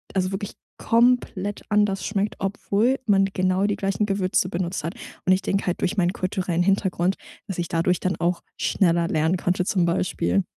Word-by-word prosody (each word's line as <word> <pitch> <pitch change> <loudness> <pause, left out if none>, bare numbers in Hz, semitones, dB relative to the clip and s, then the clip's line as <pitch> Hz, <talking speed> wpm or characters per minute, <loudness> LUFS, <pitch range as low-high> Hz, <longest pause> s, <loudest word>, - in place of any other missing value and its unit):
also 185 0 +1
wirklich 195 +1 -4 0.3
komplett 230 -4 +1
anders 205 -3 +2
schmeckt, 205 0 -1
obwohl 205 +6 0
man 195 -2 +4
genau 185 0 +1
die 205 - +1
gleichen 195 +1 0
Gewürze 195 -2 +1
benutzt 180 -1 -3
hat. 165 - -4 0.3
Und 185 - +6
ich 185 - +1
denke 195 0 -1
halt, 180 - -1
durch 195 - 0
meinen 180 -1 +2
kulturellen 185 -2 -1
Hintergrund 190 -1 +1 0.3
dass 190 -3 -5
ich 170 - -1
dadurch 170 +1 +1
dann 185 0 0
auch 175 0 0 0.2
schneller 170 -3 +2
lernen 160 +1 +1
konnte 180 +1 0
zum 185 -4 +1
Beispiel. 100 - 0
185 Hz, 175 wpm, -24 LUFS, 175-200 Hz, 0.3 s, Und